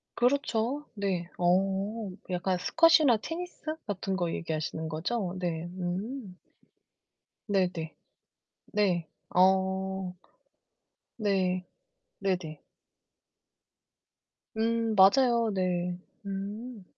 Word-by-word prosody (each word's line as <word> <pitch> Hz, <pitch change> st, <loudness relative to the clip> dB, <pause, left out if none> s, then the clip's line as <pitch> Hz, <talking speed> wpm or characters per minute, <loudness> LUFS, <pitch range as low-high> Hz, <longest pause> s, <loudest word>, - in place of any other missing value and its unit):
그렇죠. 250 Hz, +1 st, +1 dB
네. 190 Hz, -5 st, -2 dB
어. 195 Hz, +4 st, +1 dB, 0.2 s
약간 180 Hz, +1 st, 0 dB
스쿼시나 320 Hz, -, +5 dB
테니스 325 Hz, +3 st, -5 dB
같은 195 Hz, -1 st, -2 dB
거 175 Hz, -3 st, 0 dB
얘기하시는 160 Hz, 0 st, -3 dB
거죠? 180 Hz, +4 st, -2 dB
네. 170 Hz, -3 st, -2 dB, 0.2 s
음. 190 Hz, +3 st, -4 dB, 1.1 s
네네. 180 Hz, -5 st, 0 dB, 0.8 s
네. 180 Hz, -6 st, +1 dB, 0.3 s
어. 190 Hz, 0 st, +2 dB, 1.0 s
네. 190 Hz, -4 st, +1 dB, 0.5 s
네네. 180 Hz, -6 st, -2 dB, 2.0 s
음, 230 Hz, 0 st, +1 dB
맞아요. 230 Hz, +3 st, +5 dB
네. 180 Hz, -1 st, 0 dB, 0.3 s
음. 205 Hz, +3 st, -5 dB
190 Hz, 140 characters per minute, -29 LUFS, 180-225 Hz, 2.0 s, 스쿼시나